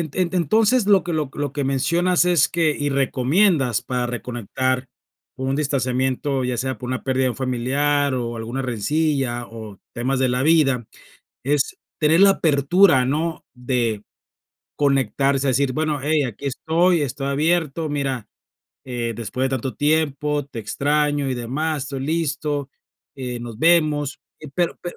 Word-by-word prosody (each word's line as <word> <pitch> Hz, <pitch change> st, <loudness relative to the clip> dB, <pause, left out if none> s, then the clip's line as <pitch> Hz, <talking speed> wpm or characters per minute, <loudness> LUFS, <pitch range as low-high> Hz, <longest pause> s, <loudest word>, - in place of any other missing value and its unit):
ente 185 Hz, 0 st, 0 dB
entonces, 215 Hz, -, +3 dB
lo 200 Hz, -2 st, +5 dB
que 175 Hz, -, -4 dB
lo 150 Hz, -4 st, -1 dB
lo 145 Hz, 0 st, -3 dB
que 145 Hz, -, -2 dB
mencionas 170 Hz, +7 st, +2 dB
es 175 Hz, -5 st, +3 dB
que 165 Hz, -2 st, +1 dB
y 145 Hz, -, 0 dB
recomiendas 135 Hz, -, +2 dB
para 125 Hz, -1 st, -2 dB
reconectar 125 Hz, +2 st, -2 dB, 0.5 s
un 130 Hz, +1 st, -1 dB
distanciamiento, 130 Hz, -1 st, 0 dB
ya 125 Hz, -1 st, -1 dB
sea 130 Hz, +2 st, -2 dB
por 125 Hz, -, -7 dB
una 130 Hz, 0 st, -3 dB
pérdida 130 Hz, -1 st, 0 dB
de 130 Hz, -, +2 dB
un -, -, -7 dB
familiar, 135 Hz, +3 st, 0 dB
o 120 Hz, -2 st, -3 dB
alguna 120 Hz, +4 st, -4 dB
rencilla, 130 Hz, +1 st, -1 dB
o 110 Hz, -3 st, -10 dB, 0.2 s
temas 130 Hz, +3 st, -1 dB
de 130 Hz, -1 st, +2 dB
la 125 Hz, +1 st, 0 dB
vida, 135 Hz, -7 st, +3 dB, 0.6 s
es 145 Hz, 0 st, 0 dB, 0.2 s
tener 160 Hz, +3 st, +4 dB
la 200 Hz, 0 st, +8 dB
apertura, 150 Hz, -2 st, +4 dB
¿no?, 160 Hz, +4 st, -2 dB
de 120 Hz, -4 st, -1 dB, 0.7 s
conectarse, 140 Hz, 0 st, +1 dB
a -, -, +3 dB
decir: 130 Hz, +1 st, +1 dB
"Bueno, 155 Hz, 0 st, -1 dB
hey, 150 Hz, 0 st, +2 dB
aquí 125 Hz, +4 st, -6 dB
estoy, 165 Hz, +5 st, +2 dB
estoy 135 Hz, 0 st, -3 dB
abierto, 160 Hz, +1 st, 0 dB
mira, 135 Hz, -5 st, -2 dB, 0.6 s
eh, 120 Hz, -2 st, -3 dB
después 120 Hz, +4 st, -3 dB
de 135 Hz, -, 0 dB
tanto 130 Hz, 0 st, -3 dB
tiempo, 150 Hz, -1 st, 0 dB
te 120 Hz, -, -9 dB
extraño 145 Hz, +3 st, 0 dB
y -, -, 0 dB
demás. 140 Hz, +5 st, -2 dB
Estoy 135 Hz, 0 st, -5 dB
listo, 150 Hz, -2 st, -2 dB, 0.4 s
eh, 125 Hz, -2 st, -5 dB
nos 120 Hz, -2 st, -8 dB
vemos". 155 Hz, -3 st, +2 dB, 0.2 s
Y 155 Hz, -, -9 dB
pero 170 Hz, +4 st, -1 dB
pero 175 Hz, -, -6 dB
140 Hz, 155 wpm, -22 LUFS, 130-155 Hz, 0.7 s, la